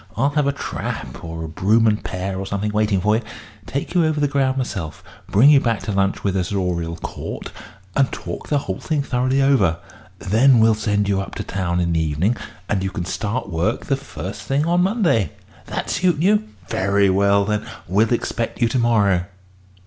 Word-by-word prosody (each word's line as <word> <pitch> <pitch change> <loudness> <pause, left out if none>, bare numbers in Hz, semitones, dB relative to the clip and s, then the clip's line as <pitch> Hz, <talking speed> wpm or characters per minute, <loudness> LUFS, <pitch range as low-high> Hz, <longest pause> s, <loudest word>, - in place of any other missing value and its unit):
I'll 140 +2 +2
have 150 -1 +1
a - - +3
trap, 140 - -5
or 80 0 -5
a - - -4
brougham 105 +7 +2
and 105 -1 +2
pair, 95 +1 -3
or 95 - -4
something, 100 +2 -2
waiting 105 -2 +1
for 105 +3 +3
you - - -3 0.5
take 140 +6 -3
you 175 -2 +4
over 155 -1 +1
the 145 - +2
ground 135 -2 +1
myself, 95 - -4 0.3
bring 130 +9 +6
you 145 - +7
back 115 -5 0
to 105 - -3
lunch 95 0 0
with 100 -1 0
us 90 0 -1
at 100 - 0
Oriel 85 -3 -1
Court, - - -6 0.4
and 135 -1 +3
talk - - -6
the 145 - +2
whole 95 -9 -3
thing 150 -3 -1
thoroughly 130 +1 +1
over. 100 -12 +3 0.4
Then 115 +7 +4
we'll 110 0 +5
send 105 -1 0
you 100 -1 +1
up 95 - -7
to - - -4
town 90 -2 -2
in 85 -1 +1
the 80 - +2
evening, 80 +9 +1 0.3
and 100 -2 0
you 95 - -1
can 95 -3 -4
start 105 +4 -3
work 85 +7 -1
the 135 - +1
first 105 -7 -7
thing 135 +8 0
on 175 +1 +2
Monday. 180 - +2 0.3
That - - -3
suit 180 -4 +2
you? 205 +5 +3 0.2
Very 100 0 +2
well, 100 +1 +3
then. 105 0 -1 0.2
We'll 105 +6 +2
expect 115 -1 -2
you 120 - +3
to 130 - 0
morrow." 100 -7 +3
105 Hz, 205 wpm, -21 LUFS, 95-135 Hz, 0.5 s, you